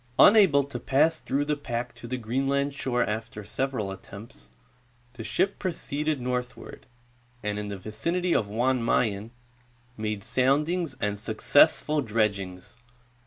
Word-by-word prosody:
Unable 190 -10 +7
to 140 - -6
pass 155 +4 +2
through 145 +1 -1
the 150 0 0
pack 125 -4 -4
to 120 - -10
the 130 +2 -3
Greenland 135 +4 0
shore 125 -3 0
after 105 0 -4
several 110 -2 -2
attempts, 95 - -11 0.6
the 120 -3 -8
ship 190 - 0
proceeded 155 -5 -2
northward, 125 0 -5 0.6
and 105 0 -2
in 105 - -4
the 100 -1 -5
vicinity 170 - -1
of 105 - +1
Jan 120 +4 +1
Mayen 110 -2 +1 0.7
made 105 -2 -3
soundings 145 +6 +1
and 105 0 -1
successful 150 +7 +3
dredgings. 100 -5 -2
125 Hz, 130 wpm, -27 LUFS, 105-145 Hz, 0.7 s, Unable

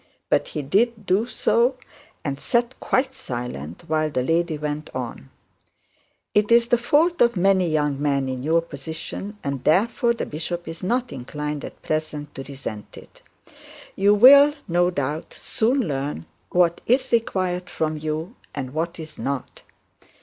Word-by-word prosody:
But - - +3
he 150 - -4
did 215 - +1
do 195 +5 +2
so, 245 +1 +2 0.5
and 140 -1 -2
sat 240 +1 +1
quite 265 +1 +1
silent 120 - -6
while 155 0 +1
the 130 -4 -1
lady 165 +2 +1
went 150 0 -4
on. 120 - -5 1.0
'It 210 +1 +2
is 235 0 +5
the 240 - +4
fault 315 +8 +2
of 235 -3 +4
many 185 -1 +3
young 150 -3 0
men 140 -2 +1
in 130 -1 -3
your 165 +4 +2
position, 160 +7 -6
and 140 -2 -3
therefore 230 - +3
the - - -3
bishop 170 +3 -4
is 165 0 -7
not 240 +5 0
inclined 150 +3 -5
at - - -9
present 155 -1 -3
to - - -7
resent 135 -6 -8
it. - - -15 0.7
You 200 +2 +4
will, 280 +6 +8
no 175 +1 +3
doubt, 150 -2 -3
soon 250 +5 +1
learn 135 - -3 0.2
what 175 -1 +2
is 255 +2 +2
required 185 -6 0
from 155 -1 -1
you, 155 - -4 0.2
and 130 -2 -4
what 165 +2 -2
is 155 -1 -9
not. 135 +2 -4
165 Hz, 155 wpm, -23 LUFS, 145-225 Hz, 1.0 s, will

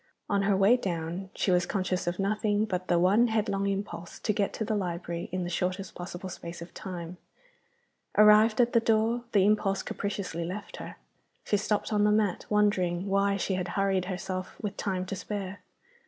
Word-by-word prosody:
On 200 - +1
her 195 -1 +2
way 200 +6 +5
down 175 -1 -3
she 190 - +1
was 180 0 +3
conscious 185 -3 -1
of 175 +1 -1
nothing 210 +1 +1
but 185 -3 -3
the 175 - +3
one 200 +7 +4
headlong 210 -3 0
impulse 195 -3 -4
to 210 - +1
get 200 -1 0
to 220 - -3
the 215 - -1
library 170 -3 -3
in 185 0 -2
the - - -3
shortest 185 +2 -2
possible 175 +1 -7
space 170 -2 -7
of 170 +1 -10
time. 180 -1 -7 1.0
Arrived 215 +1 +7
at 240 -1 +4
the 230 - +6
door, 230 +2 +1
the 200 -4 +4
impulse 205 -2 +2
capriciously 180 -5 -3
left 195 +4 -6
her. - - -8 0.5
She 205 - +1
stopped 210 +2 -1
on 205 -1 +3
the 210 - +4
mat, 210 -4 +1
wondering 190 -4 +2
why 200 0 +2
she 195 - -1
had 185 0 -1
hurried 195 -2 +2
herself, 185 0 -4
with 205 -2 -4
time 185 -2 -2
to 195 - -4
spare. 200 0 -5
195 Hz, 185 wpm, -29 LUFS, 180-210 Hz, 1.0 s, Arrived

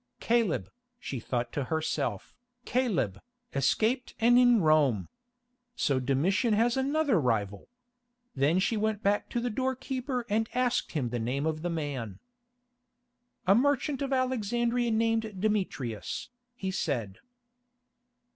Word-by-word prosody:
"Caleb," 230 -6 +1 0.3
she 135 - -5
thought 120 0 -2
to 140 - -2
herself, 145 -8 -2 0.3
"Caleb, 210 - 0 0.3
escaped 220 - +1
and 240 +2 +6
in 245 -2 +6
Rome! 150 - +3 0.7
So 135 - +1
Domitian 185 - +1
has 235 +2 +2
another 275 - +2
rival." 105 -6 -1 0.7
Then 145 +5 +2
she 195 +4 +1
went 215 0 -1
back 205 +1 +1
to 240 - -1
the 240 0 -2
door 260 +4 -1
keeper 255 -1 -3
and 220 +2 0
asked 250 -1 0
him 135 -7 -1
the 120 0 -2
name 130 +6 -1
of 155 -1 -1
the 175 - -2
man. 140 - -4 1.3
"A 190 - +6
merchant 280 +3 +1
of 275 -1 -2
Alexandria 240 -2 0
named 225 -2 0
Demetrius," 185 - -2 0.3
he 190 -5 -3
said. 120 - -2
205 Hz, 125 wpm, -29 LUFS, -, 1.3 s, and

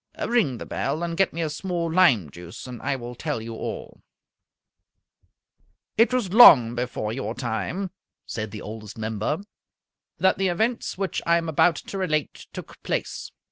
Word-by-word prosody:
Ring 220 - +2
the - - -7
bell 150 +5 -2
and 170 -1 -2
get 195 +1 +2
me 170 - -4
a 155 - -1
small 170 0 -3
lime 125 - +4
juice, 85 +2 -10
and 125 -2 -8
I 140 0 -1
will 120 -1 -7
tell 150 +1 -3
you 115 +1 -7
all." - - -6 1.9
It 230 +3 +4
was 235 -8 -1
long 130 - +9
before 120 -3 -3
your 115 -2 -4
time 140 - -3 0.3
(said 110 -2 -4
the 105 0 -8
Oldest 105 0 -8
Member) 110 - -2 0.8
that 190 0 +2
the 195 - +2
events 220 +7 -1
which 195 -1 -2
I 170 0 +5
am 165 -1 -2
about 160 +2 +3
to 195 - -6
relate 155 -5 -2
took - - -10
place. - - -3
150 Hz, 165 wpm, -25 LUFS, 115-185 Hz, 1.9 s, long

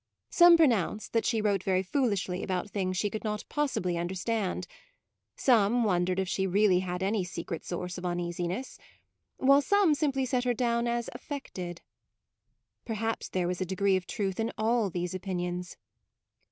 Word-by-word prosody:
Some 345 -1 +8
pronounced 230 - +1
that 230 - +1
she 225 -3 +1
wrote 200 -3 +2
very 185 0 +1
foolishly 195 -5 -1
about 185 +1 -3
things 185 -2 -1
she 205 +2 0
could 215 - -5
not 210 -1 -2
possibly 185 - -1
understand; 185 +2 -2 0.7
some 235 -1 +3
wondered 180 -3 +1
if 190 -1 0
she 190 +1 0
really 190 -1 +4
had 180 0 -3
any 200 0 +1
secret 170 -1 -5
MAUDE, - - -23
13 - - -13
source 180 0 -5
of 180 - -7
uneasiness; 175 +6 -3 0.6
while 275 +2 +5
some 400 +1 +3
simply 275 -3 0
set 250 -1 0
her 245 -1 +1
down 235 0 +1
as 235 0 -1
affected. 180 - -6 1.0
Perhaps 225 0 -3
there 180 -2 -1
was 180 +1 -3
a - - +3
degree 190 +1 +1
of 185 -1 -2
truth 195 -4 -2
in 225 +1 0
all 220 -1 +1
these 175 0 -3
opinions. 180 -1 -4
195 Hz, 165 wpm, -29 LUFS, 180-235 Hz, 1.0 s, Some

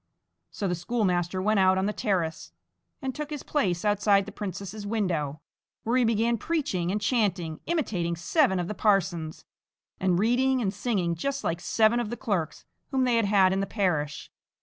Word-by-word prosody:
So 200 - -3
the 175 - 0
schoolmaster 180 -1 -1
went 215 0 +3
out 190 0 +4
on 190 - +1
the 210 - -1
terrace, 175 -8 -2 0.5
and 265 -1 -2
took 300 +2 -5
his 295 -3 -5
place 185 - 0
outside 205 -1 +3
the 210 - -8
princess's 200 0 -6
window, 165 -9 -1 0.4
where 230 +2 0
he 255 - +4
began 230 +1 +1
preaching 195 - -1
and 210 - 0
chanting 195 -8 0
imitating 195 - -1
seven 190 - +2
of 175 - -2
the 210 - -3
parsons, 180 -7 0 0.5
and 185 -2 +2
reading 255 +6 +2
and 200 -5 -1
singing 195 -10 -1
just 275 +12 -3
like 165 +1 -2
seven 220 +4 +3
of 235 -3 -2
the 240 - -4
clerks 190 - -2 0.2
whom 265 -2 +1
they 245 -2 +2
had 230 - +2
had 195 -2 +4
in 190 - 0
the 195 - -1
parish. 155 -9 -1
200 Hz, 180 wpm, -27 LUFS, 175-230 Hz, 0.5 s, out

